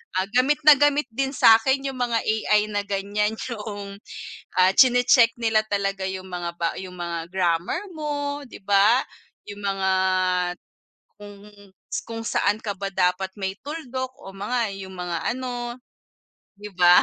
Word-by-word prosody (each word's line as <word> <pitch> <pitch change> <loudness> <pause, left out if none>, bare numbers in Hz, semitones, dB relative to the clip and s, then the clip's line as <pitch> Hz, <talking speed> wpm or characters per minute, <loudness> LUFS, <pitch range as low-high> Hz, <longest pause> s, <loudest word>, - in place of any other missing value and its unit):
ah, 185 - +2
gamit 270 +5 +2
na 300 -2 +8
gamit 290 -2 +2
din 270 +4 -2
sa'kin 265 +4 +4
yung 260 - -7
mga 240 -2 0
AI 215 -1 +1
na 205 -1 -2
ganiyan, 205 +2 -1 0.2
'yung, 205 -3 -6 0.6
ah, 185 0 +5
tsine-check 245 -1 +5
nila 225 -2 +2
talaga 195 -2 -1
'yung 190 0 -5
mga 175 -1 -4
ba 170 -1 -1
'yung 185 -1 -8
mga 170 -1 -4
grammar 175 - 0
mo, 290 -2 -3
'di 220 - -13
ba. 205 +5 +4 0.5
'Yung 205 - -9
mga 195 -1 -1 1.3
kung 205 0 -12 0.6
kung 225 0 -6
saan 205 +2 +1
ka 205 -2 -3
ba 195 0 -3
dapat 185 +1 +1
may 190 0 -3
tuldok, 260 -4 -5
o 195 - -9
mga, 215 +3 -2
'yung 190 -1 -9
mga 175 -2 -3 0.2
ano, 245 -2 -4 0.8
'di 210 0 -9
ba. 175 0 +7
210 Hz, 150 wpm, -24 LUFS, 190-245 Hz, 1.3 s, na